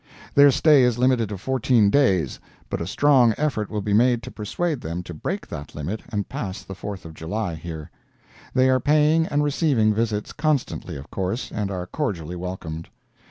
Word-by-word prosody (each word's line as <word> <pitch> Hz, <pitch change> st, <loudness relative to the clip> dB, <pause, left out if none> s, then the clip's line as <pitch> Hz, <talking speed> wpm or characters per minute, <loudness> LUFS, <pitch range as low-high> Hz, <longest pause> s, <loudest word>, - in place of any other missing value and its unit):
Their 145 Hz, 0 st, +8 dB
stay 145 Hz, +1 st, +5 dB
is 125 Hz, -2 st, +3 dB
limited 125 Hz, -3 st, +2 dB
to 105 Hz, -, -4 dB
fourteen 120 Hz, -1 st, +2 dB
days, 95 Hz, -, +2 dB, 0.3 s
but -, -, -2 dB
a 85 Hz, -, -3 dB
strong 125 Hz, 0 st, +4 dB
effort 130 Hz, -9 st, -1 dB
will 105 Hz, -1 st, -3 dB
be 105 Hz, -, 0 dB
made 120 Hz, +2 st, +3 dB
to -, -, -7 dB
persuade 145 Hz, -, -2 dB
them 85 Hz, +2 st, -4 dB
to 85 Hz, -, -8 dB
break 75 Hz, -, -4 dB
that 70 Hz, -, -8 dB
limit 85 Hz, +9 st, -4 dB
and 100 Hz, -2 st, -2 dB
pass 95 Hz, -2 st, -5 dB
the 95 Hz, -, -8 dB
Fourth 95 Hz, -1 st, -7 dB
of 80 Hz, -, -9 dB
July 90 Hz, +4 st, -3 dB
here. 80 Hz, -1 st, -7 dB, 0.6 s
They 130 Hz, 0 st, +5 dB
are 130 Hz, -, +3 dB
paying 150 Hz, +4 st, +3 dB
and 145 Hz, 0 st, +1 dB
receiving 140 Hz, -7 st, +2 dB
visits 105 Hz, -1 st, -1 dB
constantly, 150 Hz, -, -1 dB
of 70 Hz, +2 st, -10 dB
course, 95 Hz, +5 st, -3 dB
and 105 Hz, -2 st, -2 dB
are 90 Hz, -2 st, -4 dB
cordially 90 Hz, -, -3 dB
welcomed. 85 Hz, -3 st, -6 dB
110 Hz, 185 wpm, -23 LUFS, 90-130 Hz, 0.6 s, Their